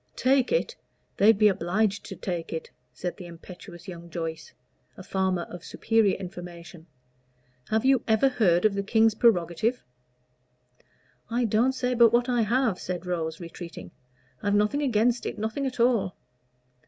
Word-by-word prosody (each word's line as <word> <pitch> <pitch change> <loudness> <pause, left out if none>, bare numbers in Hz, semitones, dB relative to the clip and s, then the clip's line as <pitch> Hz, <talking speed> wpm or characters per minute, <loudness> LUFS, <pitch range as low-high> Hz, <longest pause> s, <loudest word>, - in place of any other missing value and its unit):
"Take 260 -1 +2
it! 485 -1 0 0.4
they'd 215 +1 +5
be 215 0 +5
obliged 200 +3 0
to 195 - -7
take 175 -2 -4
it," 160 - -5 0.2
said 175 +8 -5
the 180 -3 -9
impetuous 175 0 -12
young 170 -2 -9
Joyce, 160 -1 -5 0.5
a 185 - -9
farmer 190 -2 -1
of 175 -1 -10
superior 225 -3 +1
information. 175 -2 -9 0.8
"Have 220 +2 +1
you 265 -3 +4
ever 220 +4 +4
heard 190 -7 +2
of 215 - +4
the 200 - -1
king's 220 +2 +3
prerogative?" 215 +1 +1 1.5
"I 240 +1 0
don't 230 +4 +2
say 250 -1 -1
but 235 -2 +6
what 240 +1 +2
I 245 -2 +1
have," 225 -2 +1
said 180 0 -5
Rose, 165 -3 -3
retreating. 170 - -9 0.5
"I've 205 -1 +1
nothing 210 +8 +2
against 240 -2 +1
it - - -5
nothing 220 +6 -2
at 255 -2 -6
all." 230 -6 +2
205 Hz, 155 wpm, -26 LUFS, 175-235 Hz, 1.5 s, but